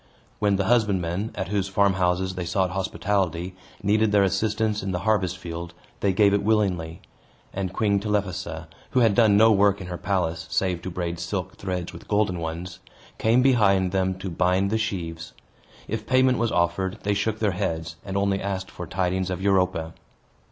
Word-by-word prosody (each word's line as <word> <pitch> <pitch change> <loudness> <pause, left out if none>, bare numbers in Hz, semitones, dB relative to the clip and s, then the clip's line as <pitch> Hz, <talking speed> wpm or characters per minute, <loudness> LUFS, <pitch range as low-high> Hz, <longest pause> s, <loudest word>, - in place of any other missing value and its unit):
When 100 -1 +2
the 100 - +1
husbandmen, 100 -4 +1
at 95 - -3
whose 100 -2 0
farmhouses 95 -1 +1
they 90 -1 -4
sought 90 +1 0
hospitality, 95 -2 -1 0.3
needed 105 +1 +3
their 100 -1 +4
assistance 105 +2 0
in 95 -1 -3
the 90 - -2
harvest 95 -5 +1
field, 85 -1 -7 0.2
they 100 - +2
gave 100 +1 +4
it 100 - +2
willingly; 95 -6 0 0.5
and 95 -1 -3
Queen 100 0 +1
Telephassa 95 -5 -2 0.2
(who 130 - +2
had 115 -3 +4
done 105 -1 +5
no 110 +1 +6
work 100 -1 +3
in 95 - -7
her 90 -1 -6
palace, 85 -4 -1
save 90 -3 0
to 95 - -5
braid 85 -1 -4
silk 90 +2 -4
threads 90 -2 -4
with - - -11
golden 105 -4 +1
ones) 85 +2 -5 0.4
came 115 +3 +3
behind 100 -8 +3
them 95 0 0
to 95 -1 -5
bind 90 +3 +1
the 110 - +1
sheaves. 85 -7 -4 0.5
If 110 0 -4
payment 130 -1 +3
was 115 -2 +1
offered, 90 +2 0
they 105 - +1
shook 105 +2 -1
their 105 -2 +1
heads, 80 -4 -3
and 95 0 -4
only 100 0 +1
asked 95 -1 -3
for 90 - -7
tidings 95 +1 -1
of 90 - -3
Europa. 95 -4 +1
95 Hz, 180 wpm, -25 LUFS, 90-105 Hz, 0.5 s, no